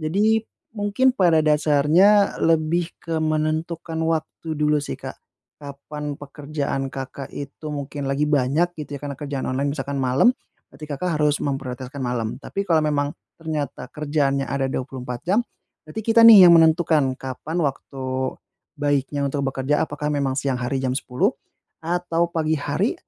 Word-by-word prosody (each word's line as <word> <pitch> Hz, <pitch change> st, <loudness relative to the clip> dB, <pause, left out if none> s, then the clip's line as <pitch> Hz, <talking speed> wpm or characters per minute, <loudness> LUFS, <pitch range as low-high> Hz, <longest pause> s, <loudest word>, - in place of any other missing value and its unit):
Jadi, 205 Hz, +8 st, +2 dB, 0.3 s
mungkin 220 Hz, +5 st, +2 dB
pada 170 Hz, -8 st, +3 dB
dasarnya, 155 Hz, +7 st, +4 dB
lebih 165 Hz, +1 st, +2 dB
ke 165 Hz, -1 st, -2 dB
menentukan 155 Hz, +1 st, -1 dB
waktu 160 Hz, -1 st, -2 dB
dulu 150 Hz, 0 st, +2 dB
sih, -, -, -5 dB
Kak. -, -, -8 dB, 0.4 s
Kapan 145 Hz, +1 st, -7 dB
pekerjaan 140 Hz, -1 st, -4 dB
Kakak 135 Hz, 0 st, -6 dB
itu 145 Hz, +2 st, -8 dB
mungkin 140 Hz, 0 st, -5 dB
lagi 135 Hz, +2 st, 0 dB
banyak, 145 Hz, +5 st, +2 dB
gitu 145 Hz, -1 st, -6 dB
ya, 140 Hz, -, -8 dB
karena 140 Hz, -2 st, -5 dB
kerjaan 140 Hz, -2 st, -4 dB
online 140 Hz, +2 st, -1 dB
misalkan 140 Hz, -1 st, -4 dB
malam, 130 Hz, -, +4 dB, 0.4 s
berarti 150 Hz, +3 st, -10 dB
Kakak 155 Hz, +2 st, -2 dB
harus 150 Hz, -1 st, +1 dB
memprioritaskan 135 Hz, -1 st, -4 dB
malam. 120 Hz, -3 st, -2 dB
Tapi 195 Hz, +7 st, -4 dB
kalau 165 Hz, -5 st, +2 dB
memang 145 Hz, -1 st, 0 dB, 0.2 s
ternyata 155 Hz, -3 st, -5 dB
kerjaannya 145 Hz, -2 st, 0 dB
ada 135 Hz, -1 st, -1 dB
24 125 Hz, -2 st, -5 dB
jam, 210 Hz, +6 st, +3 dB, 0.4 s
berarti 155 Hz, +7 st, -9 dB
kita 230 Hz, 0 st, +5 dB
nih, 210 Hz, -5 st, +10 dB
yang 170 Hz, -, +8 dB
menentukan 160 Hz, -5 st, +3 dB
kapan 140 Hz, +6 st, -5 dB
waktu 135 Hz, -3 st, -3 dB, 0.7 s
baiknya 145 Hz, -1 st, 0 dB
untuk 140 Hz, 0 st, -2 dB
bekerja. 135 Hz, +2 st, 0 dB
Apakah 150 Hz, -1 st, -3 dB
memang 135 Hz, -2 st, 0 dB
siang 135 Hz, -2 st, -1 dB
hari 135 Hz, +2 st, -1 dB
jam 130 Hz, -1 st, -1 dB
10.00, 130 Hz, -1 st, 0 dB, 0.5 s
atau 170 Hz, 0 st, 0 dB
pagi 160 Hz, -1 st, 0 dB
hari. 145 Hz, -, -1 dB
150 Hz, 150 wpm, -22 LUFS, 140-160 Hz, 0.7 s, nih